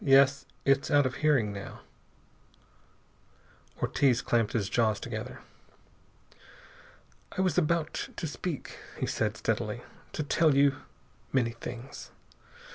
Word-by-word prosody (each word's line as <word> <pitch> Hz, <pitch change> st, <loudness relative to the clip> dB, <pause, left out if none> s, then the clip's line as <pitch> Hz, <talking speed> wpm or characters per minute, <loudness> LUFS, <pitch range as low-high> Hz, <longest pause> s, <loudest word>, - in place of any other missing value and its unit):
"Yes, 140 Hz, 0 st, +5 dB, 0.2 s
It's 135 Hz, 0 st, +3 dB
out 145 Hz, -1 st, +5 dB
of 130 Hz, 0 st, -2 dB
hearing 135 Hz, -9 st, +3 dB
now." 100 Hz, 0 st, -8 dB, 2.0 s
Ortiz 130 Hz, -4 st, +2 dB
clamped 115 Hz, -3 st, +1 dB
his 105 Hz, -4 st, 0 dB
jaws 110 Hz, -1 st, +2 dB
together. -, -, -6 dB, 2.0 s
"I -, -, +2 dB
was 185 Hz, -5 st, +2 dB
about 165 Hz, -2 st, 0 dB
to -, -, -4 dB
speak," 155 Hz, 0 st, -5 dB, 0.2 s
he -, -, -1 dB
said -, -, -1 dB
steadily, -, -, -1 dB, 0.3 s
"to 155 Hz, -, -1 dB
tell 155 Hz, 0 st, +3 dB
you 140 Hz, -1 st, +4 dB, 0.5 s
many 120 Hz, -3 st, +2 dB
things. 120 Hz, +3 st, -8 dB
135 Hz, 115 wpm, -29 LUFS, 120-150 Hz, 2.0 s, Yes